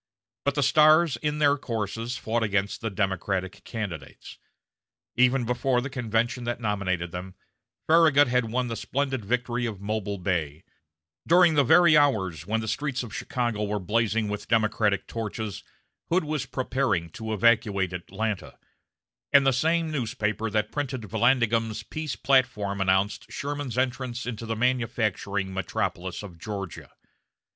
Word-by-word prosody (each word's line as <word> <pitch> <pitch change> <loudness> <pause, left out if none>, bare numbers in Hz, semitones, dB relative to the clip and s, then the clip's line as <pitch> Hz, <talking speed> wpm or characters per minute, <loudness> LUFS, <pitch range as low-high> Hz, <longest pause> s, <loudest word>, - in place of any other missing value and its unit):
But 140 0 +1
the 145 - +2
stars 155 +2 +5
in 150 +4 -2
their 145 -1 +3
courses 115 +1 -3
fought 115 +1 -1
against 100 +1 -1
the 115 - -2
Democratic 95 -1 -2
candidates. 90 - -7 0.8
Even 125 +1 +3
before 125 +1 +1
the 135 +2 -4
convention 120 -1 -1
that 120 0 -2
nominated 95 -6 -1
them, 90 +1 -7 0.5
Farragut 155 -3 +5
had 125 0 +2
won 125 +2 -1
the 115 - -3
splendid 130 +1 -2
victory 120 +2 -1
of 105 -4 -6
Mobile 105 0 -3
Bay; 80 -5 -2 0.6
during 175 0 +6
the 145 -2 +4
very 165 +4 +6
hours 95 - +2
when 110 +1 0
the 110 - -5
streets 135 +2 -2
of 110 -4 -9
Chicago 120 -4 -2
were 105 0 -1
blazing 110 +2 0
with 105 0 -5
Democratic 110 -3 +1
torches, 110 -2 -5 0.5
Hood 175 +1 +2
was 155 -2 -3
preparing 130 -10 -1
to 110 +1 -6
evacuate 105 -4 +2
Atlanta; 100 +4 -4 0.7
and 140 -1 +6
the 135 - +4
same 160 +4 +1
newspaper 110 -5 -2
that 105 0 -1
printed 135 -4 -3
Vallandigham's 115 0 +1
peace 155 -6 -5
platform 105 -5 +1
announced 95 +2 +1
Sherman's 145 -5 -4
entrance 125 -1 -1
into 115 -2 -5
the 115 - -1
manufacturing 110 -5 -1
metropolis 95 -1 -3
of 90 -5 -10
Georgia. 100 -3 -6
115 Hz, 140 wpm, -26 LUFS, 100-130 Hz, 0.8 s, during